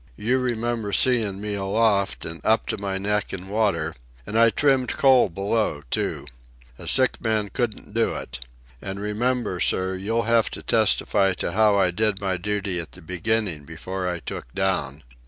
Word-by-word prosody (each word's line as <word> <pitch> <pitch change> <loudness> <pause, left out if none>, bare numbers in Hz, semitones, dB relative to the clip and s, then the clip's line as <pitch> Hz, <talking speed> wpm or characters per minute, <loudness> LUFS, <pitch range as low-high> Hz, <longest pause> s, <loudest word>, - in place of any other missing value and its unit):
You 125 +5 +1
remember 120 -3 -2
seein' 110 -7 +3
me 105 0 -4
aloft, 100 0 +1
an' 80 0 -7
up 110 +1 +2
to - - -1
my 100 -1 -2
neck 105 +1 -1
in 95 0 -6
water. 100 -7 0 0.3
And 105 - -6
I 115 0 +6
trimmed 135 0 +2
coal 130 -5 +5
below, 100 -4 -1
too. 70 - -1 0.5
A - - -9
sick 130 -1 +3
man 110 -3 0
couldn't 110 -1 -4
do 115 0 +1
it. 65 +1 -6 0.4
And 95 0 -5
remember, 110 -1 -1
sir, 95 +1 +1
you'll 110 +5 -1
have 115 -1 +3
to - - -10
testify 100 -3 +2
to - - -3
how 105 +1 +4
I 95 -2 +3
did 105 +2 0
my 95 -2 -1
duty 100 -1 -1
at 85 - -7
the - - -12
beginning 90 -2 -1
before 90 +4 -5
I 90 - -2
took - - -7
down." 90 -7 -1
100 Hz, 175 wpm, -24 LUFS, 95-115 Hz, 0.5 s, I